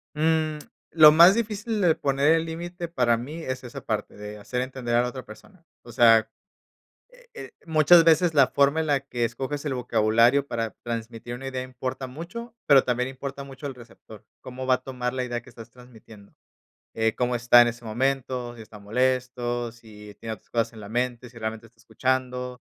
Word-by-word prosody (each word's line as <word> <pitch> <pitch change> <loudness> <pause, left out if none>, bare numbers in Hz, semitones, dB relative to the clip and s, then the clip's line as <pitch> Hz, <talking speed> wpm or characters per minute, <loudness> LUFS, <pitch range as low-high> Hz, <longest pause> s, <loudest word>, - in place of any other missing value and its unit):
Mm, 155 0 +1 0.3
lo 155 -2 +8
más 170 +6 +7
difícil 215 -1 -2
de 170 -3 +4
poner 140 +2 +1
el 165 0 +1
límite 170 +1 -6
para 125 -8 +1
mí 140 +8 -7
es 130 0 -5
esa 120 - -8
parte, - - -3
de 105 0 -8
hacer 125 +4 -4
entender 125 -2 -3
a 120 - +4
la 125 - -2
otra 130 0 -8
persona. 170 - -16 0.2
O 120 - -12
sea, 115 -2 +5 0.8
eh - - -21
eh, 475 - -9
muchas 160 +1 +6
veces 165 +1 +4
la 140 -3 +5
forma 140 +3 +2
en 155 - -3
la 140 -2 +2
que 125 -3 -4
escoges 135 +5 -3
el 145 - -1
vocabulario 120 +3 +3
para 115 -4 -3
transmitir 115 0 -6
una 135 +2 -8
idea 130 -1 -4
importa 130 +1 -5
mucho, 190 - -9
pero 140 -2 +6
también 125 0 -1
importa 140 +1 -7
mucho 135 +1 -11
el 135 - -7
receptor, 115 -3 -15 0.2
¿cómo 130 0 -7
va 130 0 +4
a 130 - -10
tomar 125 -2 -4
la 130 -1 -2
idea 120 -1 -4
que - - -17
estás 115 0 -13
transmitiendo? 115 -4 -17 0.6
Eh, 110 0 0
¿cómo 125 0 0
está 120 0 +6
en 120 - +4
ese 120 0 -10
momento? 125 +1 -2
Si 115 - -11
está 110 0 -13
molesto, 120 +1 -1
si 105 -3 -14
tiene 110 -1 -5
otras 105 - -15
cosas 115 0 -1
en 110 - -12
la 100 - -10
mente, 125 +1 -2
si 115 - -16
realmente 110 +1 -5
está 115 0 -31
escuchando. 125 0 -2
125 Hz, 200 wpm, -25 LUFS, 120-140 Hz, 0.8 s, lo